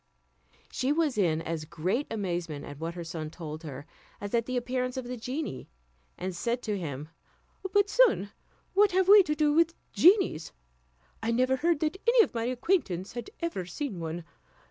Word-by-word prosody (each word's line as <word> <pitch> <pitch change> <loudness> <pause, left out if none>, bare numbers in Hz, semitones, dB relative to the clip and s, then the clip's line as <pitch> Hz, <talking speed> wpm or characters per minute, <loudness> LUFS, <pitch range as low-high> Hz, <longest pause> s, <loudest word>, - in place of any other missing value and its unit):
She 260 +2 0
was 305 -3 +1
in 165 -6 +1
as 165 -2 -3
great 170 - -2
amazement 175 -8 -3
at 145 0 -9
what 165 +1 -4
her 175 - -5
son 160 -2 -5
told 155 -1 -7
her, 145 -3 -8 0.3
as 205 +1 -6
at 230 -1 +1
the 255 0 -1
appearance 250 +1 -2
of 260 - -3
the 250 +1 -4
genie; 250 - -5 0.5
and 185 0 -4
said 235 +7 -1
to 210 -2 -1
him, 150 -5 -5 0.6
"But, 405 0 +4
son, 405 - +3 0.4
what 400 0 +4
have 375 0 +3
we 410 +1 +10
to 300 -5 -1
do 300 -1 +3
with 330 +1 +3 0.2
genies? 355 - +4 0.7
I 225 - -1
never 255 +3 +2
heard 330 +1 +1
that 315 +4 0
any 470 -1 +7
of - - -5
my 230 -1 -1
acquaintance 245 - 0
had 240 -2 -6
ever 335 - -2
seen 220 - -4
one. 165 +1 -4
235 Hz, 180 wpm, -29 LUFS, -, 0.7 s, we